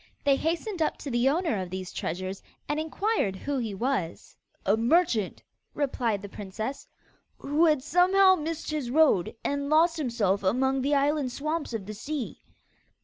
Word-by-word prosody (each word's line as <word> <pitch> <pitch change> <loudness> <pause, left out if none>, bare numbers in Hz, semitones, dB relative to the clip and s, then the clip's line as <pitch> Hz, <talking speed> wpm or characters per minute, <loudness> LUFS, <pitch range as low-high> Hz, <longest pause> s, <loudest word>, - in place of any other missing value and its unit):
They 280 -1 +5
hastened 335 +5 -2
up 310 - +1
to 280 - -6
the 240 +2 +3
owner 310 - 0
of 185 - -5
these 185 0 -6
treasures, 185 +3 -4 0.3
and 295 +1 -1
inquired 320 - 0
who 280 +7 -3
he 220 -5 -3
was. 210 -7 -2 0.3
'A 200 - +4
merchant,' 235 - +1 0.3
replied 235 -7 -1
the - - -5
princess, 210 +6 -6 0.5
'who 300 +4 +2
had 300 -4 +2
somehow 375 +5 +5
missed 325 -2 -3
his 295 -6 -2
road, 275 - +3
and 285 0 -1
lost 330 +2 +4
himself 230 -9 0
among 260 +7 +1
the 285 +2 +2
island 285 -1 +1
swamps 305 +3 -3
of 220 -4 -4
the 215 - -6
sea. 275 +3 -5
275 Hz, 160 wpm, -27 LUFS, 215-310 Hz, 0.5 s, They